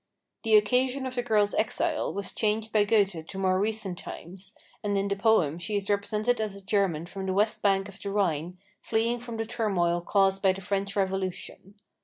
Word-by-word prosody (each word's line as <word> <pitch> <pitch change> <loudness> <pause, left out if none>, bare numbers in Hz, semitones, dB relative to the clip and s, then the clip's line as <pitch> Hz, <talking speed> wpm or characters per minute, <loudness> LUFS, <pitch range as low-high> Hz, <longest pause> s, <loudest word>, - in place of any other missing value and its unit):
The 220 -1 +3
occasion 250 +5 +2
of 260 - -4
the 245 - 0
girl's 210 -4 +2
exile 220 - 0
was 200 -1 -5
changed 220 0 -1
by 210 -1 +4
Goethe 200 -7 +1
to 190 - -8
more 185 -1 +2
recent 210 -3 -2
times, 185 +3 -9 0.3
and 205 -1 0
in 195 0 0
the 200 - 0
poem 195 -7 +2
she 205 +4 -3
is 200 0 -1
represented 215 +3 0
as 210 -2 -3
a 200 -1 -11
German 190 -6 +1
from 190 +2 -6
the 185 - -1
west 210 +2 +1
bank 195 -1 +2
of 195 -1 -12
the 200 - -4
Rhine 180 -4 -1 0.2
fleeing 230 +2 0
from 235 -1 -7
the 225 - -2
turmoil 195 -7 0
caused 195 +1 +2
by 190 -2 +4
the 195 - -8
French 195 +1 -2
Revolution. 190 0 -3
200 Hz, 200 wpm, -28 LUFS, 190-220 Hz, 0.3 s, by